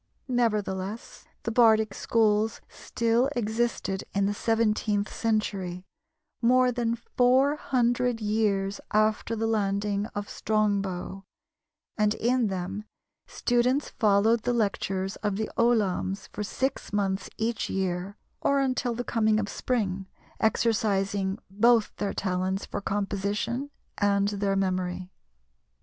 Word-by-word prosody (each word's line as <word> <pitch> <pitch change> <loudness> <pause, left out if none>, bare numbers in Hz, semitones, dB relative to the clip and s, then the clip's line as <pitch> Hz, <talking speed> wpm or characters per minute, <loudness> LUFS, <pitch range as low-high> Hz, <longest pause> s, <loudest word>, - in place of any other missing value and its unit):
Nevertheless, 215 -4 -2 0.2
the 230 - -2
bardic 220 -3 +4
schools 220 0 +1
still 235 +3 0
existed 220 -4 -1
in 200 0 +2
the 205 - +1
seventeenth 215 -2 0
century, 195 -5 -1 0.6
more 250 +1 +4
than 235 -1 0
four 255 +4 +2
hundred 245 -3 +1
years 210 -2 0
after 215 +1 +1
the 225 0 -1
landing 205 -1 0
of 205 0 -3
Strongbow, 200 -3 -1 0.8
and, 210 0 +3
in 245 0 +1
them, 195 +2 -4 0.4
students 250 +4 +1
followed 215 +1 +3
the 245 +2 0
lectures 195 -3 -1
of 205 -2 -1
the 215 +2 -3
ollamhs 205 -4 +1
for 210 - -6
six 260 +6 -2
months 195 -2 -1
each 225 0 -1
year, 190 +1 -2 0.2
or 280 0 +2
until 255 -3 0
the 245 - -3
coming 220 -2 +2
of 205 - -2
spring, 195 -4 -2 0.3
exercising 200 -3 +1
both 225 +3 +3
their 205 -1 -1
talents 185 0 -1
for - - -5
composition 205 +6 -2 0.3
and 200 0 +2
their 200 -1 0
memory. 185 -1 -1
210 Hz, 115 wpm, -27 LUFS, 195-235 Hz, 0.8 s, bardic